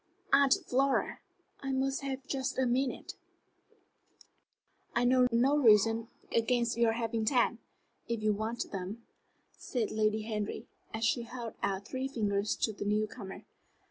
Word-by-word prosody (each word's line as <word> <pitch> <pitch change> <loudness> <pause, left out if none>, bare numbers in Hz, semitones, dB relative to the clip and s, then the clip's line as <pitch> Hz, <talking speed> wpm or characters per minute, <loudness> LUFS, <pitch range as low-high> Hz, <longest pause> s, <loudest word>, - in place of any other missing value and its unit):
"Aunt 275 -1 +6
Flora, 270 +2 +1 0.4
I 270 - -3
must 270 +1 0
have 270 -1 -4
just 270 -2 -2
a 260 - +2
minute." 250 +2 -1 1.8
"I 240 +1 +3
know 250 0 +5
no 250 +5 +4
reason 225 -1 +5 0.3
against 235 +1 +2
your 230 -1 +3
having 230 -1 -1
ten, 235 0 +2 0.5
if 230 -2 -2
you 215 0 +3
want 220 +3 -3
them," 195 +4 -5 0.6
said 235 -5 -2
Lady 215 0 +1
Henry, 215 -2 -3 0.3
as 220 0 -1
she 240 - +2
held 235 -1 -6
out 200 +1 -2
three 260 +1 -2
fingers 210 -5 0
to 220 - +2
the 205 - -5
new 210 +1 +1
comer. 210 -3 -9
235 Hz, 140 wpm, -31 LUFS, 215-260 Hz, 1.8 s, Aunt